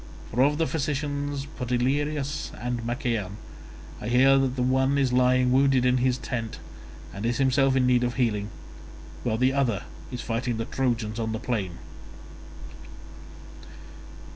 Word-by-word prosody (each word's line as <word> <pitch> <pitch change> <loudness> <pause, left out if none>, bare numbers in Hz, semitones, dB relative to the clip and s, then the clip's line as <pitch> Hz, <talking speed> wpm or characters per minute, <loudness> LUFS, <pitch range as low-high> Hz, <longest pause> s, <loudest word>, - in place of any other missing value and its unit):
For 125 - +1
of 145 +2 +3
the 165 - +2
physicians 145 -2 -2
Podalirius 140 +3 -1
and 120 0 -3
Machaon, 115 -5 -2 0.6
I - - -5
hear 135 +3 +5
that 130 -1 0
the 125 - 0
one 130 +2 +2
is 135 -3 +1
lying 125 0 +3
wounded 135 -1 +4
in 125 0 +3
his 125 0 +1
tent 115 -5 -4 0.6
and 100 - -6
is 120 +1 0
himself 135 0 +3
in 130 -1 +3
need 125 -1 +3
of 120 0 -1
healing, 105 -5 0 0.7
while 110 -2 0
the 130 +2 +2
other 120 -8 0 0.3
is 125 - -4
fighting 120 0 -2
the 115 - -2
Trojans 120 -4 -1
upon 110 -1 -2
the 110 - -3
plain." 100 -10 -3
125 Hz, 145 wpm, -26 LUFS, 120-135 Hz, 0.7 s, hear